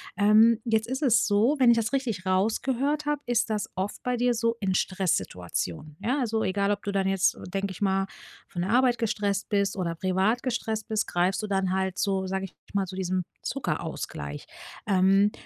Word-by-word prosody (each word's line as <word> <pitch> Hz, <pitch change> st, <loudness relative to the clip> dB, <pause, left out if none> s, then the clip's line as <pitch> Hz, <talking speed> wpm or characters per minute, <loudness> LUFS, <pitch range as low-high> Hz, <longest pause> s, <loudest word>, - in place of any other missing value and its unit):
Ähm, 215 Hz, +3 st, +5 dB
jetzt 220 Hz, -2 st, +1 dB
ist 260 Hz, +3 st, -3 dB
es 245 Hz, -6 st, +4 dB
so, 220 Hz, +8 st, +3 dB
wenn 255 Hz, -3 st, +6 dB
ich -, -, +5 dB
das 225 Hz, -1 st, 0 dB
richtig 235 Hz, -9 st, -2 dB
rausgehört 255 Hz, +10 st, +1 dB
habe, 295 Hz, -1 st, +1 dB
ist 240 Hz, -1 st, +1 dB
das 210 Hz, -1 st, -1 dB
oft 190 Hz, +2 st, -3 dB
bei 250 Hz, 0 st, 0 dB
dir 245 Hz, +1 st, +2 dB
so 230 Hz, 0 st, +1 dB
in 190 Hz, -2 st, 0 dB
Stresssituationen. 145 Hz, -, -2 dB
Ja, 250 Hz, +7 st, 0 dB
also 225 Hz, -3 st, 0 dB
egal, 200 Hz, +1 st, +1 dB
ob 205 Hz, 0 st, -2 dB
du 200 Hz, -, -2 dB
dann 195 Hz, -1 st, +1 dB
jetzt, 195 Hz, -1 st, +2 dB
äh, -, -, -12 dB
denke 195 Hz, +1 st, -2 dB
ich 190 Hz, -, -10 dB
mal, 195 Hz, -1 st, +2 dB, 0.4 s
von 175 Hz, -, -5 dB
der 185 Hz, +3 st, -1 dB
Arbeit 250 Hz, 0 st, +4 dB
gestresst 205 Hz, -3 st, -1 dB
bist 200 Hz, -2 st, +1 dB
oder 175 Hz, -3 st, -2 dB
privat 190 Hz, +7 st, +1 dB
gestresst 225 Hz, -3 st, -2 dB
bist 220 Hz, -1 st, -1 dB
greifst 180 Hz, +3 st, +1 dB
du -, -, -2 dB
dann 190 Hz, -2 st, 0 dB
halt 190 Hz, -1 st, -1 dB
so, 195 Hz, -2 st, 0 dB
sage 190 Hz, +1 st, -2 dB
ich 190 Hz, -, -13 dB, 0.2 s
mal, 195 Hz, -1 st, +2 dB
zu 185 Hz, 0 st, -8 dB
diesem 185 Hz, -1 st, -1 dB, 0.2 s
Zuckerausgleich. 70 Hz, 0 st, -4 dB, 0.4 s
Ähm, 195 Hz, +1 st, +4 dB
200 Hz, 200 wpm, -27 LUFS, 190-230 Hz, 0.4 s, wenn